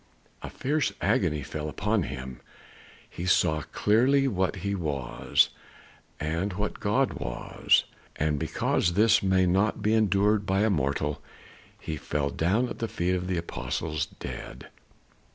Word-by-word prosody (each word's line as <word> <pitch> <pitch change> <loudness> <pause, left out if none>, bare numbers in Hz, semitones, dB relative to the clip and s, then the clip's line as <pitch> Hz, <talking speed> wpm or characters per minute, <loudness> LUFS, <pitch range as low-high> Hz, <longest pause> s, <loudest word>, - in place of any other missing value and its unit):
A - - -6
fierce 145 -4 0
agony 90 - +1
fell 75 +2 -5
upon 105 +6 0
him. 65 -4 -6 0.7
He 90 - -6
saw 80 -3 +3
clearly 130 +6 +3
what 95 -4 0
he 100 - 0
was, 75 -9 +1 0.7
and 85 +6 -2
what 105 +3 -3
God 110 +5 +1
was; - - +1 0.3
and 75 -1 0
because 85 - 0
this 110 +3 +4
may 95 -1 +3
not 95 +4 +1
be 105 - +2
endured 105 -1 +3
by 95 +1 +2
a 110 0 +3
mortal, 75 -2 -1 0.6
he 80 - -5
fell 70 -1 -2
down 105 +10 +1
at - - -7
the 115 - -1
feet 90 -3 -1
of 90 0 -2
the 90 -1 -1
apostle 75 0 -4 0.2
dead. - - -7
95 Hz, 140 wpm, -27 LUFS, 75-105 Hz, 0.7 s, this